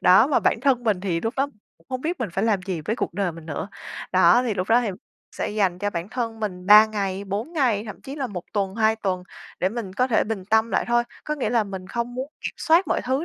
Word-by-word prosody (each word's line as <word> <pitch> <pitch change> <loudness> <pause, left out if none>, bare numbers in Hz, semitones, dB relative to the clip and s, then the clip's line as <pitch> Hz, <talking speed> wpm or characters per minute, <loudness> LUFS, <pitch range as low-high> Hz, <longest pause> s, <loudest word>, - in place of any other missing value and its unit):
Đó, 185 +6 +7
mà 285 - +2
bản 225 - +2
thân 255 -3 +2
mình 210 -5 +1
thì 175 -4 -1
lúc 225 +3 -2
đó 275 +1 +1 0.3
cũng 165 - -28
không 255 -1 -3
biết 325 +1 -3
mình 230 - -1
phải 195 +4 0
làm 205 -5 +1
gì 185 -3 -3
với 215 +10 -2
cuộc - - -3
đời 195 -4 0
mình 165 0 -11
nữa. 160 +6 -4 0.4
Đó, 185 +5 +6
thì 235 -4 -1
lúc 185 -1 -2
đó 235 +2 +5
thì 235 - -1 0.5
sẽ - - -2
dành 195 -4 +1
cho 205 +2 -1
bản 170 +1 -4
thân 230 -2 -3
mình 185 -4 -4
3 210 +2 +9
ngày, 200 -2 -3
4 205 - -4
ngày, 245 -10 +1
thậm 210 - -8
chí 275 +1 -8
là 275 -3 -2
1 180 -6 -6
tuần, 195 -2 -1
2 220 0 +3
tuần 185 -4 -2 0.4
để 185 - +2
mình 215 -3 -5
có 250 +6 +2
thể 235 - +2
bình 210 -4 -4
tâm 220 +2 +2
lại - - +1
thôi. 240 0 +3 0.2
Có 300 - -1
nghĩa 280 - -2
là 230 -3 +2
mình 190 -2 -7
không 235 +3 -3
muốn 260 +2 -4
kiểm - - -4
soát 340 +3 +3
mọi - - +1
thứ 265 +6 0
215 Hz, 270 wpm, -24 LUFS, 190-245 Hz, 0.5 s, 3